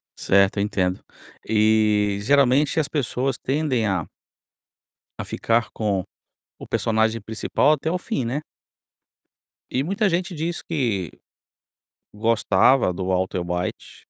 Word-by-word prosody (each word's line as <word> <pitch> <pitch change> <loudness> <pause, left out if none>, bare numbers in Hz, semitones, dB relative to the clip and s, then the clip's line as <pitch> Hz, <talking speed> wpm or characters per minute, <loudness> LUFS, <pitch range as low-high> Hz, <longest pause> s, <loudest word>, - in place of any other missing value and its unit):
Certo, 100 +1 +2
eu 100 - +2
entendo. 90 -3 -1 0.4
E 105 -2 +3
geralmente 140 +5 +3
as 150 - 0
pessoas 135 -2 -1
tendem 135 -5 0
a 95 -4 -1 1.2
a - - -6
ficar 115 -1 0
com 100 -4 -1 0.6
o - - -10
personagem 110 0 +1
principal 110 +7 +1
até 155 +2 -1
o 180 - 0
fim, 180 - -3
né? 130 +6 -2 1.3
E 130 - 0
muita 200 +7 0
gente 180 +2 -1
diz 170 +2 -3
que 115 - -2 1.0
gostava 110 0 +3
do 90 +1 -4
Walter 95 -1 0
White 90 +1 -5
115 Hz, 120 wpm, -23 LUFS, 100-145 Hz, 1.3 s, E